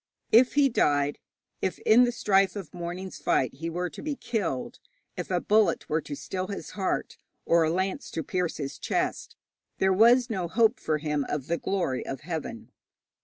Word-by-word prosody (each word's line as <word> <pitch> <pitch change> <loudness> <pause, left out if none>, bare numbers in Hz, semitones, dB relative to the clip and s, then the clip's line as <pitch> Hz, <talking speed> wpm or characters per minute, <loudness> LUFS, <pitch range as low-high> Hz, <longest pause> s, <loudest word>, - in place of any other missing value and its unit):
If 245 +4 +5
he 285 -1 +5
died, 145 - +1 0.4
if 190 - -1
in 240 +3 +5
the 245 - 0
strife 195 -4 +2
of 190 -7 -7
the - - -12
morning's 180 +2 -5
fight 130 - +1
he 165 +5 -5
were 175 +2 -2
to - - -9
be 300 -1 -3
killed, 195 - -3 0.4
if - - -5
a - - +1
bullet 215 0 +2
were 160 +1 +1
to 145 - -6
still 185 +5 -4
his 200 - -6
heart, 195 -2 -2 0.3
or 170 0 +4
a 160 - +2
lance 185 +3 -2
to 160 - -1
pierce 180 0 -2
his 140 -2 -5
chest, - - -2 0.4
there 190 0 +3
was 235 +5 +5
no 190 -7 -2
hope 225 +6 +3
for 155 -1 0
him 150 -1 -1
of 145 -3 -2
the 170 +3 -1
glory 175 -10 -1
of 135 - -6
heaven. 155 -8 -6
180 Hz, 190 wpm, -27 LUFS, 155-210 Hz, 0.4 s, If